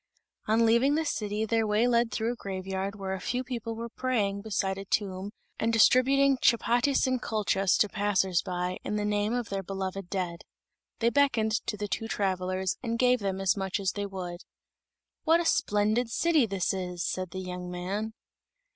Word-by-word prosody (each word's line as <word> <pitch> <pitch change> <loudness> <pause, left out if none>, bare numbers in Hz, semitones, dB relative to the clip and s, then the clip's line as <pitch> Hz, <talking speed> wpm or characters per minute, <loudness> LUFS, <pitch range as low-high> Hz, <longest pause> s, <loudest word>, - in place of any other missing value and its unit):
On 225 +2 +4
leaving 235 +6 +4
the 320 +1 0
city 210 -5 -1
their 225 0 +1
way 210 +3 +3
led 235 -1 +2
through 230 +1 -1
a - - -9
graveyard 195 -1 -4
where 195 -2 -4
a 190 - -3
few 250 +7 -2
people 235 -3 -4
were 230 +1 -5
praying 220 -5 -1
beside 195 -2 -1
a 195 - -7
tomb 195 -1 -1 0.3
and 225 - +1
distributing 265 +4 +4
chapatis 240 +3 +3
and 255 -2 0
kulchas 200 -4 +1
to 210 - +3
passers 195 -3 +1
by, 180 0 -3
in 210 - -2
the 210 0 -1
name 210 +1 0
of 245 -3 -2
their 195 -1 -2
beloved 190 0 -5
dead. 175 -3 -3 0.6
They 235 +1 +3
beckoned 245 -6 +2 0.2
to 210 - -2
the 205 0 -3
two 225 +2 -3
travelers 185 -2 -1
and 230 -2 -2
gave 250 0 +3
them 195 -2 -2
as 195 0 +2
much 190 0 -2
as 195 -1 0
they 205 -1 -3
would. 180 -2 -6 0.8
"What 325 +2 +4
a 345 - -1
splendid 215 -3 +2
city 310 0 +2
this 195 -2 -1
is!" 180 -2 -3
said 185 -1 -3
the 185 - -8
young 180 -1 -5
man. 195 +5 -3
205 Hz, 185 wpm, -28 LUFS, 190-235 Hz, 0.8 s, On